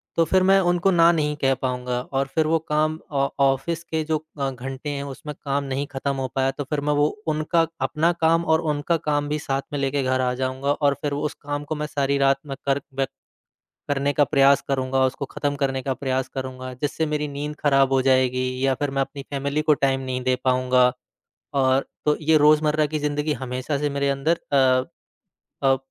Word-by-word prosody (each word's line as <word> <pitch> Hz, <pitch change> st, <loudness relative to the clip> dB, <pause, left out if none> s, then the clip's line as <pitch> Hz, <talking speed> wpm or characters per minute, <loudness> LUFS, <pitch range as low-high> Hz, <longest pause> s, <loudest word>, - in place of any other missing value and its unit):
तो 165 Hz, -, +4 dB
फिर 185 Hz, +3 st, +3 dB
मैं 195 Hz, +1 st, +5 dB
उनको 175 Hz, +2 st, +2 dB
ना 170 Hz, -1 st, +6 dB
नहीं 150 Hz, -2 st, 0 dB
कह 135 Hz, 0 st, +3 dB
पाऊँगा 125 Hz, -1 st, -2 dB
और 135 Hz, 0 st, +1 dB
फिर 160 Hz, -1 st, +2 dB
वो 165 Hz, +1 st, +3 dB
काम 155 Hz, +1 st, +1 dB
ऑ 140 Hz, -1 st, +1 dB, 0.2 s
ऑफिस 155 Hz, +5 st, 0 dB
के 160 Hz, -1 st, -2 dB
जो 155 Hz, 0 st, +1 dB, 0.2 s
अ, 135 Hz, -1 st, 0 dB
घंटे 130 Hz, +3 st, -6 dB
हैं 140 Hz, -1 st, -3 dB
उसमें 140 Hz, +2 st, -7 dB
काम 140 Hz, 0 st, 0 dB
नहीं 135 Hz, +1 st, -2 dB
ख़त्म 140 Hz, 0 st, -2 dB
हो 135 Hz, -1 st, -2 dB
पाया 135 Hz, 0 st, +2 dB
तो 145 Hz, -, -5 dB
फिर 150 Hz, -2 st, -1 dB
मैं -, -, +3 dB
वो 145 Hz, 0 st, +3 dB, 0.2 s
उनका 155 Hz, +2 st, +1 dB, 0.2 s
अपना 165 Hz, +2 st, +2 dB
काम 165 Hz, +1 st, +3 dB
और 160 Hz, 0 st, +3 dB
उनका 150 Hz, +3 st, 0 dB
काम 145 Hz, 0 st, +1 dB
भी 150 Hz, +1 st, -1 dB
साथ 135 Hz, -2 st, -2 dB
में 145 Hz, -, -1 dB
लेके 140 Hz, 0 st, 0 dB
घर 130 Hz, 0 st, +1 dB
आ 125 Hz, -1 st, +1 dB
जाऊँगा 130 Hz, +2 st, -1 dB
और 145 Hz, -1 st, +2 dB
फिर 145 Hz, -2 st, -2 dB
वो 145 Hz, -, -2 dB
उस 150 Hz, -, -2 dB
काम 145 Hz, 0 st, -4 dB
को 155 Hz, -, -3 dB
मैं 150 Hz, 0 st, -3 dB
सारी 140 Hz, -2 st, 0 dB
रात 135 Hz, 0 st, +4 dB
में 135 Hz, -, -4 dB
कर 140 Hz, +1 st, +2 dB, 0.2 s
मे 135 Hz, -, +3 dB, 0.8 s
करने 145 Hz, 0 st, +1 dB
का 145 Hz, -, +4 dB
प्रयास 140 Hz, -1 st, +4 dB
करूँगा 130 Hz, -1 st, +1 dB
उसको 130 Hz, +2 st, -3 dB
ख़त्म 145 Hz, +1 st, -2 dB
करने 135 Hz, -1 st, 0 dB
का 135 Hz, -, -1 dB
प्रयास 130 Hz, -1 st, -2 dB
करूँगा 130 Hz, -1 st, -5 dB
जिससे 150 Hz, +2 st, 0 dB
मेरी 150 Hz, 0 st, -1 dB
नींद 145 Hz, +1 st, -5 dB
खराब 135 Hz, -2 st, +3 dB
हो 135 Hz, -, +4 dB
जाएगी 130 Hz, -1 st, +2 dB, 0.2 s
या 135 Hz, -, +3 dB
फिर 145 Hz, +2 st, -2 dB
मैं 135 Hz, 0 st, -1 dB
अपनी 140 Hz, +1 st, -6 dB
फैमिली 140 Hz, +2 st, -1 dB
को 155 Hz, 0 st, +4 dB
टाइम 135 Hz, -1 st, +1 dB
नहीं 130 Hz, -1 st, -3 dB
दे 130 Hz, 0 st, +3 dB
पाऊँगा। 125 Hz, -1 st, +3 dB, 0.6 s
और 135 Hz, 0 st, +2 dB, 0.2 s
तो 150 Hz, -, +3 dB
ये 155 Hz, +1 st, +4 dB
रोज़मर्रा 150 Hz, 0 st, +4 dB
की 155 Hz, +1 st, -3 dB
ज़िंदगी 150 Hz, +1 st, -1 dB
हमेशा 130 Hz, +2 st, -3 dB
से 145 Hz, 0 st, -1 dB
मेरे 140 Hz, 0 st, 0 dB
अंदर 145 Hz, +5 st, 0 dB
अ 130 Hz, -2 st, +4 dB, 0.8 s
अ, 135 Hz, 0 st, +5 dB
140 Hz, 215 wpm, -23 LUFS, 135-150 Hz, 0.8 s, ना